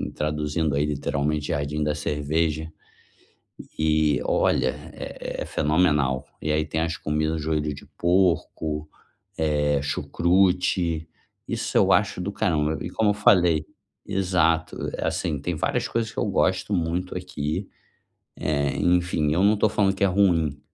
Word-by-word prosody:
traduzindo 75 0 -1
aí 75 +1 +2
literalmente, 75 0 -1
jardim 75 +1 -1
da 75 0 0
cerveja, 75 +2 -1 1.1
e 75 -3 +2
olha, - - +2 0.2
é - - -6
é - - -8
fenomenal. 75 -4 +1 0.2
E 75 - -1
aí 75 0 +1
tem 80 - -2
as 80 -1 -2
comidas, 75 +1 -1
joelho 75 -1 -1
de - - -12
porco, 85 -4 +1 0.5
eh, 75 -2 +1
chucrute, 85 0 +1 0.4
isso - - -3
eu - - +5
acho - - +2
do 100 +3 -2
caramba. 80 -7 0
E - - -4
como 105 -2 +2
eu - - +1
falei 90 -6 +4 0.4
exato, 90 -4 +1 0.2
assim, 75 - -1
tem 85 +4 -2
várias 95 +9 -1
coisas 115 -1 -2
que - - -13
eu - - +1
gosto 95 0 +1
muito 90 +1 -1
aqui, 80 -5 -4 0.7
eh, 70 -2 0
enfim, 90 -4 +1
eu 90 +4 +2
não 105 +1 +5
estou 105 0 +2
falando 100 -2 +1
que 100 - -1
é - - +5
ruim, 85 -7 +2
80 Hz, 140 wpm, -24 LUFS, 75-90 Hz, 1.1 s, eu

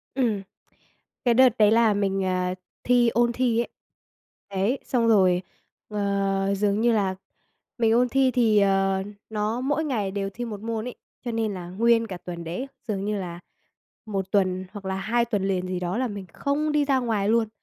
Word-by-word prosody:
Ừm. 225 -7 +1 0.8
Cái 240 - +5
đợt 255 -1 +5
đấy 210 0 +6
là 225 -2 +4
mình, 195 -1 0
ờ, 185 0 0 0.3
thi 245 -1 +4
ôn 235 +1 +2
thi 240 -2 +1
ấy. - - -3 0.8
Đấy, 200 +7 0
xong 235 -3 +1
rồi, 185 -5 +4 0.5
ờ, 200 -1 0
dường 205 +1 +1
như 240 0 +4
là 195 -3 +1 0.6
mình 225 -1 +3
ôn 245 +1 +3
thi 265 0 +3
thì, 225 -4 +3
ờ, 195 -1 +2 0.3
nó 220 +3 -1
mỗi 295 +4 0
ngày 210 -9 -1
đều 195 0 -2
thi 240 0 -4
1 210 -3 -6
môn 225 0 -3
ấy, 250 - -6 0.3
cho 240 - -2
nên 225 -2 -1
là 175 -2 -7
nguyên 230 +3 +2
cả 185 -3 -6
tuần 175 -1 -7
đấy 180 +12 -4 0.2
dường 200 -2 -2
như 210 -1 -1
là 175 -2 -6 0.7
1 195 -3 -3
tuần 185 -2 +1
hoặc 200 -2 -8
là 190 0 -2
2 235 +5 +1
tuần 205 -4 -1
liền 185 -1 -1
gì 185 -1 -2
đó 180 +4 -2
là 255 0 0
mình 200 -3 -6
không 295 +2 -1
đi 295 -1 +2
ra 270 -2 +2
ngoài 215 -4 0
luôn. 230 -1 +3
210 Hz, 195 wpm, -25 LUFS, 195-235 Hz, 0.8 s, đấy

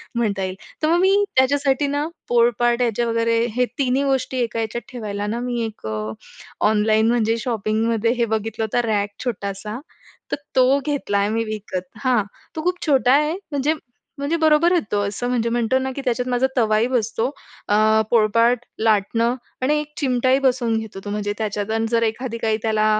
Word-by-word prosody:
म्हणता 210 -5 0
येईल. 185 0 -3 0.3
तर 310 - +4
मग 340 +2 +3
मी 390 +2 +4
त्याच्यासाठी 280 +1 +3
ना 290 +2 -1 0.2
पोळपाट 240 0 +3
याचे 235 0 +1
वगैरे 230 0 +1 0.2
हे 250 - +3
तिन्ही 265 0 +1
गोष्टी 265 -1 0
एका 230 0 -3
याच्यात 225 +1 -3
ठेवायला 205 -4 -4
ना 225 +3 -2
मी 245 -1 -2
एक 215 - -7 0.8
ऑनलाईन 215 +1 +3
म्हणजे 230 -1 +2
शॉपिंगमध्ये 225 0 0
हे 235 - +2
बघितलं 220 0 -2
होतं 220 +3 0
रॅक 205 -2 +1 0.2
छोटासा, 210 -1 -4 0.5
तर - - +2 0.2
तो 260 +2 +5
घेतला 285 -9 -1
आहे 200 +1 +1
मी 225 +1 0
विकत. 215 -4 -4 0.2
हां. 250 -5 +3 0.3
तो 315 - -4
खूप 360 +1 +1
छोटा 265 -5 +4
आहे 300 +2 +3 0.2
म्हणजे 285 +2 +1 0.4
म्हणजे 285 +4 -1
बरोबर 315 +1 +4
आहे 350 -2 +3
तो 205 - +1
अ, 200 - 0
असं 210 +4 -3
म्हणजे 235 -2 0
म्हणतो 240 +1 +1
ना, 265 0 -2
की 275 - -4
त्याच्यात 250 0 0
माझा 250 +1 +2
तवाही 220 0 +3
बसतो. 230 -1 0 0.4
अ, 215 +1 +4
पोळपाट, 230 +2 +4 0.2
लाटणं 225 +2 +2 0.3
आणि 300 +3 +2
एक 300 - -10
चिमटाही 260 -1 +2
बसवून 245 -3 +2
घेतो, 220 -3 -6
तो - - -4
म्हणजे 205 0 -2
त्याच्यात 210 -1 -2
आणि 225 0 0
जर 230 -1 +3
एखादी 230 +1 -2
काही 220 -2 0
त्याला 215 -1 +2
230 Hz, 180 wpm, -21 LUFS, 215-260 Hz, 0.8 s, तो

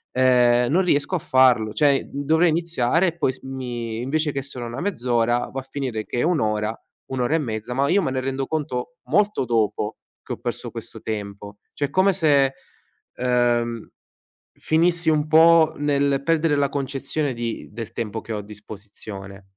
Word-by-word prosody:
ehm, 125 -1 +4
non 185 +3 +3
riesco 170 +1 +1
a - - 0
farlo. 125 -7 +3
Cioè, 140 0 +2
uhm, 140 +1 -3
dovrei 160 +3 +4
iniziare 165 0 +1
e 170 0 -3
poi 140 -5 +1
s - - -15
mi 120 -4 -5
invece 150 +3 0
che 135 - -2
solo 125 -3 -7
una 120 - -6
mezz'ora 120 - 0
va 135 - -4
a 130 - -19
finire 125 -6 -3
che 120 - -3
è - - +2
1 170 -1 +2
ora, 105 0 0 0.4
1 130 - -3
ora 125 +6 +1
e 165 - +2
mezza. 110 -2 -4
Ma 140 +2 +1
io 200 +1 +4
me 130 - -1
ne 130 - -1
rendo 135 +1 -2
conto 150 0 -3
molto 210 -7 +2
dopo 110 -2 0 0.3
che - - -5
ho - - -6
perso - - -5
questo - - -9
tempo, 100 -1 -6 0.2
cioè 145 -1 -2
come 190 +4 +3
se, 140 -6 +3 0.6
ehm, 120 -2 0 0.7
finissi 165 +1 +2
un 150 0 +1
po' 160 0 +6
nel 140 -1 +1
perdere 165 -1 +2
la 140 -1 +1
concezione 140 +1 -2
di 115 -1 -5
del 115 0 -7
tempo 110 -1 -4
che 115 - -6
ho - - -2
a - - -7
disposizione. 100 -1 -10
130 Hz, 185 wpm, -23 LUFS, 115-155 Hz, 0.7 s, po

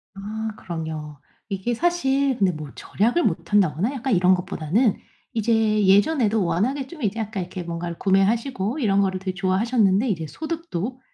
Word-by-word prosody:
아 215 +3 -4
그럼요. 160 -3 -6 0.3
이게 195 +4 -2
사실 275 -3 +1
근데 195 -2 +3
뭐 155 -3 -7
절약을 240 - 0
못 165 -2 -1
한다거나 200 - +2
약간 265 -1 -1
이런 185 +1 +5
것보다는 185 - 0 0.4
이제 225 0 0 0.3
예전에도 210 +1 +3
워낙에 245 +12 0
좀 340 -3 -11
이제 215 0 -1
아까 215 -2 -3
이렇게 180 0 -5
뭔가를 170 0 -5
구매하시고 215 +5 +1
이런 200 -6 +2
거를 190 -1 0
되게 190 0 -3
좋아하셨는데 195 +3 +2
이제 165 -5 -1
소득도 305 - -4
200 Hz, 370 characters per minute, -23 LUFS, 185-240 Hz, 0.4 s, 이런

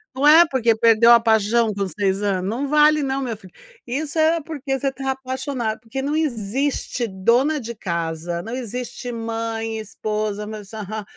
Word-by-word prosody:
não 285 +3 +2
é, 330 +3 +9
porque 235 -5 +2
perdeu 230 +1 +6
a 235 - +8
paixão 220 0 +2
com 200 -1 -2
6 195 0 -1
ano 190 -2 -1
não 255 +7 -2
vale 300 0 +5
não, 270 0 -1
meu 240 -4 -3
filho. 190 -4 -16 0.3
Isso 290 +5 -3
é 325 +1 +3
porque 285 -3 -4
você 275 0 0
tá 270 0 -5
apaixonado. 260 -3 -3
Porque 260 +3 -5
não 290 +2 -1
existe 255 -2 -1
dona 240 +10 +2
de 235 -1 -6
casa, 170 -2 -3
não 225 +3 -6
existe 245 0 -5
mãe, 225 -1 -3
esposa, 210 0 -3
meus 210 -2 -8
aha 215 0 -5
230 Hz, 170 wpm, -22 LUFS, 210-270 Hz, 0.3 s, é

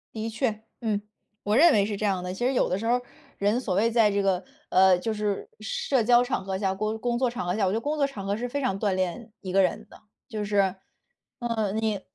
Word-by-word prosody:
的 220 +1 -3
确， 225 -1 -1 0.2
嗯， 215 -4 -1 0.4
我 210 +3 +2
认 330 +1 +7
为 200 -1 +4
是 205 -1 -3
这 215 - -2
样 190 -3 0
的。 180 0 -4
其 240 +6 -2
实 265 - +2
有 250 - +2
的 185 - 0
时 225 - -5
候 235 - +3
儿， 250 - +1 0.4
人 205 +5 +1
所 195 -8 -2
谓 230 +4 +3
在 225 -2 +4
这 200 0 +1
个， 185 -2 +2 0.3
呃， 185 -1 +6
就 225 +4 -2
是 210 -2 -2
社 240 +4 0
交 245 +1 +6
场 245 -6 -2
合 190 -1 -2
下， 190 -1 0
工 215 +3 -2
工 240 0 -1
作 255 - +2
场 235 -6 -4
合 180 - 0
下， 200 - +2
我 185 - +1
觉 - - -1
得 225 - 0
工 300 +4 -2
作 280 -1 +2
场 205 -8 -7
合 200 +2 -1
是 245 +2 -3
非 285 +3 -3
常 195 -7 -1
锻 200 -3 +1
炼 185 +5 -2
一 185 - -5
个 195 +1 +4
人 215 +3 0
的。 - - -16 0.3
就 215 -3 -3
是， 200 -2 +2 0.7
呃， 220 -4 0
你 220 -2 -1
215 Hz, 280 characters per minute, -26 LUFS, 195-235 Hz, 0.7 s, 认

